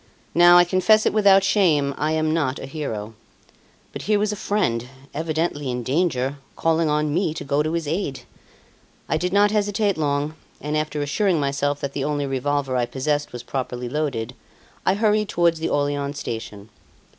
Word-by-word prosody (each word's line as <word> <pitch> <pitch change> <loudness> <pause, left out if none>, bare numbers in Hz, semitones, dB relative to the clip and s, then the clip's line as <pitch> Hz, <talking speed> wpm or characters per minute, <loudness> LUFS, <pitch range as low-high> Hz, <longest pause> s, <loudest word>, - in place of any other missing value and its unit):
Now, 175 +1 +7
I 175 - +8
confess 185 +5 +3
it - - +2
without 200 -2 +5
shame, 160 -9 +2
I 155 +1 -1
am 155 0 +1
not 145 -5 0
a - - -7
hero. 115 -7 -5 0.8
But - - -6
here 210 - +4
was 210 +1 0
a - - -3
friend, 125 - -1 0.3
evidently 155 -2 -2
in 125 -1 -3
danger, 135 -1 0 0.2
calling 165 -1 +1
on 150 0 0
me 165 -2 0
to 155 - -5
go 140 +1 +1
to 155 +2 -1
his 165 -3 -2
aid. 155 -4 -2 0.9
I - - +1
did 180 +3 -2
not 205 +1 +4
hesitate 205 -3 0
long; 145 0 0 0.3
and 150 +1 -3
after 155 -1 -1
assuring 175 +4 +1
myself 140 0 -1
that 140 0 -3
the 140 - -2
only 145 0 -1
revolver 135 0 -1
I 120 -1 +1
possessed 145 +3 -1
was 120 -1 -7
properly 125 -1 -4
loaded, 130 -4 -2 0.5
I 185 - +4
hurried 210 0 +1
towards 170 -1 +2
the 160 - -1
Orleans 145 0 -1
station. 110 -4 -6
150 Hz, 180 wpm, -23 LUFS, 140-175 Hz, 0.9 s, I